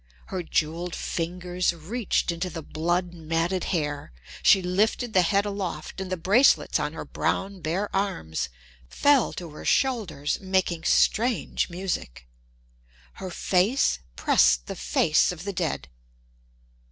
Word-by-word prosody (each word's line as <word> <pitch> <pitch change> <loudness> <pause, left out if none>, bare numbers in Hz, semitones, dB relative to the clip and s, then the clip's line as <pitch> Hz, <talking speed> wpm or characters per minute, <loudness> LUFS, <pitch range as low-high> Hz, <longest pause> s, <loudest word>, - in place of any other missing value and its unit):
Her 185 - -1
jeweled 165 +1 -1
fingers 180 +1 -2
reached 190 +4 -1
into 170 +2 -3
the 165 -2 -7
blood 175 +4 -1
matted 165 +2 -1
hair. 150 - -2 0.3
She 190 - +5
lifted 215 +6 0
the 185 - +6
head 200 +3 +2
aloft, 190 -4 -4
and 190 -1 -5
the 185 - -1
bracelets 205 +11 +4
on - - -2
her - - -6
brown, 195 -1 -2
bare 180 +8 -2
arms 80 - -2 0.4
fell 285 -4 +3
to 170 -3 -7
her 150 - -10
shoulders, 200 - 0
making 185 -3 0
strange 235 -2 +2
music. 175 - -4 0.9
Her 190 - -4
face 185 - +2 0.2
pressed - - +3
the - - -6
face 60 - +2
of 175 -1 -8
the 200 0 -4
dead. 165 - -2
180 Hz, 130 wpm, -26 LUFS, 160-195 Hz, 0.9 s, the